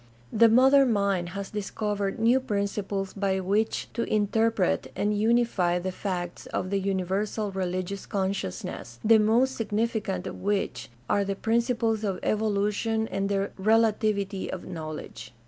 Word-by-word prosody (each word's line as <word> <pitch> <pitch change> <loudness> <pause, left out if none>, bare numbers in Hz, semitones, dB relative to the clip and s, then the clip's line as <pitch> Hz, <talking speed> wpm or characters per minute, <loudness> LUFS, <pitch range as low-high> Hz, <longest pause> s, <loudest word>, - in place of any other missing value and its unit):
The 230 +1 +6
modern 265 +2 +6
mind 200 -4 +1
has 200 -1 -5
discovered 205 -1 -2
new 235 +4 +4
principles 200 -4 -2
by 195 -1 0
which 205 +4 0
to 235 - -2
interpret 215 -1 +1
and 210 +1 0
unify 215 -5 +2
the 185 +1 -3
facts 180 -2 -4
of 185 - -3
the 200 - +1
universal 195 +2 -1
religious 185 +1 -3
consciousness, 190 - -3
the 225 0 +7
most 240 +5 +3
significant 210 -4 -1
of - - -6
which 195 - -1 0.2
are 200 - +2
the 195 0 -2
principles 230 0 0
of 195 -3 -1
evolution 215 +1 0
and 195 - -1
of - - -2
the 200 0 0
relativity 215 -2 +1
of 185 - -6
knowledge. 155 -9 -7
200 Hz, 140 wpm, -27 LUFS, 190-220 Hz, 0.2 s, the